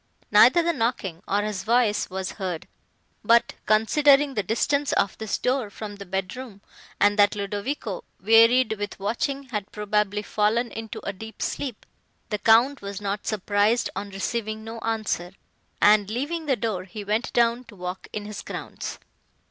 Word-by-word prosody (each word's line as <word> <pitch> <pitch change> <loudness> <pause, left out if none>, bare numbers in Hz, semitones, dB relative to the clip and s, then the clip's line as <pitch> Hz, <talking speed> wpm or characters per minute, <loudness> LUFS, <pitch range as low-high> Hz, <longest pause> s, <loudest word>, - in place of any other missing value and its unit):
Neither 345 - +7
the 340 0 +1
knocking, 225 - -2
nor 205 +1 +1
his 210 -3 -3
voice 230 -2 +2
was 190 0 -4
heard; 185 -5 -5 0.6
but, 235 0 +4
considering 275 +6 +4
the 210 - 0
distance 280 +8 0
of 195 - +1
this 220 -2 -2
door 255 -4 0
from 205 0 -8
the 200 -1 -9
bedroom, 195 +4 -5 0.4
and 205 +1 +3
that 205 +1 +5
Ludovico, 205 +1 -3 0.2
wearied 225 +2 +5
with 205 -1 -5
watching, 265 +7 -2
had 210 -4 -4
probably 210 0 0
fallen 220 +4 +1
into 225 -1 -6
a 200 - -2
deep 220 +3 -10
sleep, 255 -7 -4 0.4
the 210 - -2
Count 235 +7 +4
was 200 -1 -6
not 205 0 -3
surprised 210 +2 +1
on 200 - -4
receiving 215 +2 -3
no 225 +1 -7
answer, 215 -6 -2 0.5
and, 205 -1 +5
leaving 295 +8 -3
the 270 - +3
door, 215 -6 -3
he 205 +3 -8
went 215 +4 -1
down 235 +1 +2
to 210 - -14
walk 180 0 -6
in 210 -1 -5
his 210 -1 -6
grounds. - - -6
215 Hz, 160 wpm, -25 LUFS, 200-235 Hz, 0.6 s, Neither